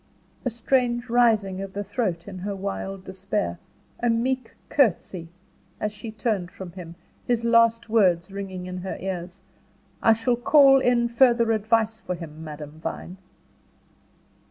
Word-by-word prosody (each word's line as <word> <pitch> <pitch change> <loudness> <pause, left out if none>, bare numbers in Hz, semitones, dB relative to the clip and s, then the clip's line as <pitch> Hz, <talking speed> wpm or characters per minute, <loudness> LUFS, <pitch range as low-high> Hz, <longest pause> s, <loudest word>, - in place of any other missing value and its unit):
A - - +2
strange 240 +1 0
rising 215 -6 +3
of 195 -1 -6
the 205 - -3
throat 195 -5 -2
in 190 -2 -7
her 200 +2 -3
wild 195 0 -4
despair, 190 - -3 0.4
a 240 - +1
meek 250 +1 0
courtesy, 185 - +1 0.5
as 210 0 -2
she 225 +2 -8
turned 215 -5 -2
from 180 -1 -9
him, 170 -2 -9 0.3
his 240 -1 +1
last 230 0 +4
words 190 -5 +3
ringing 190 -2 -6
in 180 0 -5
her 190 +1 -5
ears: 185 0 -5 0.6
"I 225 - +6
shall 235 +2 0
call 270 +2 +6
in 245 -2 +3
further 235 -1 +4
advice 220 0 +1
for 180 -4 -4
him, 160 -2 -9
Madame 150 0 -8
Vine." 180 +3 -6
205 Hz, 145 wpm, -25 LUFS, 185-235 Hz, 0.6 s, I